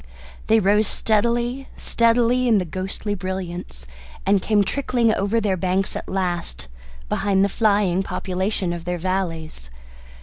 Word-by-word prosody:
They 220 +1 +5
rose 210 +1 +3
steadily, 235 +4 0
steadily 235 +2 +2
in 225 -3 +5
the 185 - 0
ghostly 190 +4 -4
brilliance, 180 - -5 0.4
and 195 0 +3
came 210 0 +3
trickling 240 -1 +1
over 205 +3 +1
their 205 -3 0
banks 185 +1 0
at - - -6
last, 175 - -2 0.4
behind 200 -1 +2
the - - 0
flying 200 -4 +2
population 185 -1 -2
of 170 -1 -6
their 180 0 -2
valleys. 165 - -3
195 Hz, 135 wpm, -22 LUFS, 180-220 Hz, 0.4 s, They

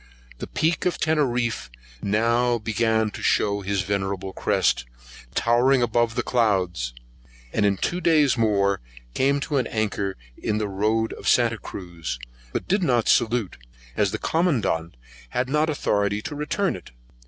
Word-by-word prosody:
The - - -5
Peek 160 +2 0
of 180 - -1
Teneriff 125 - 0 0.3
now 115 +4 +2
began 110 0 +1
to - - -8
shew 100 0 +2
his 100 -1 -1
venerable 95 0 -2
crest, - - +1 0.5
towering 125 +2 +3
above 120 0 +1
the 120 - 0
clouds; 90 - 0 0.6
and 105 -1 +3
in 100 -1 +1
two 175 - -1
days 155 -5 +4
more 100 - +2 0.3
came 140 +2 +2
to 145 - -1
an 125 - +1
anchor 100 -3 -2 0.2
in 105 - -2
the 105 -1 -1
road 110 +3 0
of - - -8
Santa 115 -2 +3
Cruz, 85 -8 -6 0.3
but - - -3
did 195 +2 +2
not 120 -9 +2
salute, 115 -4 +2 0.4
as 105 +2 +2
the - - -3
Commandant 115 - 0 0.3
had 125 - -1
not 150 +2 +2
authority 105 -8 0
to - - -5
return 150 +7 -1
it. - - -11
115 Hz, 150 wpm, -24 LUFS, 100-130 Hz, 0.6 s, days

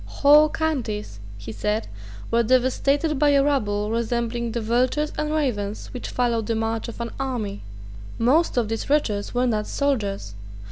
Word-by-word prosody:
Whole 295 +2 +5
counties, 235 - -3 0.2
he 100 +2 -8
said, 210 - -2 0.4
were 235 - +4
devastated 265 +5 +2
by 295 0 +4
a 275 -1 +4
rabble 210 -7 0
resembling 235 0 -1
the 235 - -2
vultures 250 +7 0
and 300 0 -2
ravens 220 -10 -2
which 250 - -6
follow 240 -2 0
the 225 +1 -2
march 225 +1 -2
of 235 - -8
an 235 - -4
army. 235 -7 -3 0.6
Most 275 +6 +2
of 235 -3 +2
these 225 +3 -4
wretches 230 -8 0
were 250 +1 +2
not 215 -3 0
soldiers. 205 - -1
235 Hz, 155 wpm, -23 LUFS, 215-280 Hz, 0.6 s, Whole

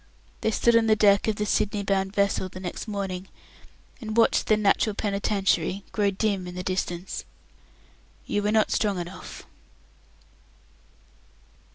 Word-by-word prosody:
They - - +1
stood 235 +2 +3
on 230 -1 +4
the 215 - +5
deck 205 -1 +4
of 220 - +1
the 210 - -2
Sydney 210 -1 0
bound 195 0 -1
vessel 200 -2 +1
the 185 - -9
next 185 +4 -6
morning, 195 -3 -4 0.7
and 215 -1 -5
watched 230 - +3
the 215 - +4
"Natural 210 0 +2
Penitentiary" 200 -3 0
grow 205 -2 +1
dim 195 -2 -1
in 180 - -8
the 180 - -4
distance. 180 -1 -3 1.0
"You 205 - -1
were 205 +1 0
not 220 0 +2
strong 205 -3 +1
enough." 180 +1 -8
200 Hz, 145 wpm, -26 LUFS, 190-215 Hz, 1.0 s, the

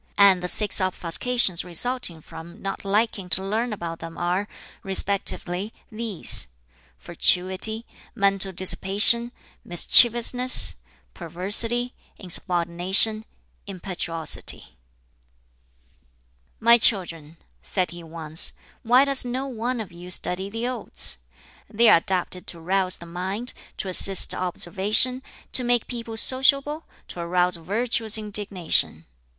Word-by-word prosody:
And 195 -3 +5
the 180 - -4
six 210 +2 0
obfuscations 185 +2 -1
resulting 180 -1 -2
from 170 +6 -13
not 195 -1 -7
liking 200 -2 -2
to 190 +2 0
learn 225 +4 -3
about 170 -5 -7
them 165 0 -10
are, 180 +4 -3 0.3
respectively, 195 0 -1 0.2
these: 220 -4 +2 0.5
fatuity, 185 - +2 0.3
mental 195 -2 0
dissipation, 200 +6 +3 0.3
mischievousness, 240 +7 +4 0.4
perversity, 205 +8 -2 0.2
insubordination, 180 +4 +1 0.4
impetuosity." 175 - 0 1.8
"My 235 +1 +4
children," 165 -8 -1 0.2
said 185 -2 -3
he 175 0 -10
once, 160 -1 -1 0.3
"why 250 +3 +3
does 275 -1 +3
no 250 +2 -5
one 245 -1 -5
of 215 -5 -8
you 175 +1 -12
study 180 +2 -4
the 225 +3 -5
Odes? 240 - -5 0.5
They 230 +2 +3
are - - +6
adapted 180 +1 -4
to 170 - -4
rouse 185 +2 -1
the 170 - -13
mind, 190 +8 -6 0.2
to - - -6
assist 190 +1 +2
observation, 200 +8 0 0.3
to 255 - +3
make 240 -1 0
people 230 -2 -7
sociable, 275 +5 +3 0.2
to - - -10
arouse 180 +1 -1
virtuous 220 +5 -1
indignation. 195 - 0
195 Hz, 110 wpm, -22 LUFS, 175-230 Hz, 1.8 s, are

